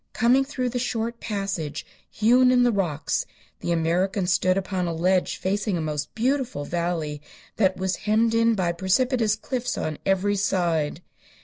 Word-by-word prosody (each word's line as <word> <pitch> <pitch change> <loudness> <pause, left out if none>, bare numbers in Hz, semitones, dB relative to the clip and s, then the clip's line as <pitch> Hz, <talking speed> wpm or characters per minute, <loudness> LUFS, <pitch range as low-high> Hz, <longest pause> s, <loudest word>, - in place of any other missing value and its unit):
Coming 235 +6 +4
through 260 -2 -3
the 245 +1 -2
short 235 -1 -2
passage 195 -8 -3 0.2
hewn 250 +4 +4
in 250 -1 +4
the 245 - +4
rocks 165 -8 -1 0.3
the - - -3
American 180 +4 +1
stood 185 +1 +2
upon 190 -2 -2
a 170 - -2
ledge 180 +2 +1
facing 200 0 -1
a - - -2
most 150 -2 -3
beautiful 250 - -1
valley, 165 -4 -2 0.4
that 190 -3 +2
was 190 0 -1
hemmed 225 +2 +1
in 230 0 +3
by 180 -4 0
precipitous 215 +5 +1
cliffs 250 +3 -3
on 155 -1 -3
every 195 +1 +1
side. 170 -5 0
195 Hz, 155 wpm, -24 LUFS, 175-230 Hz, 0.4 s, Coming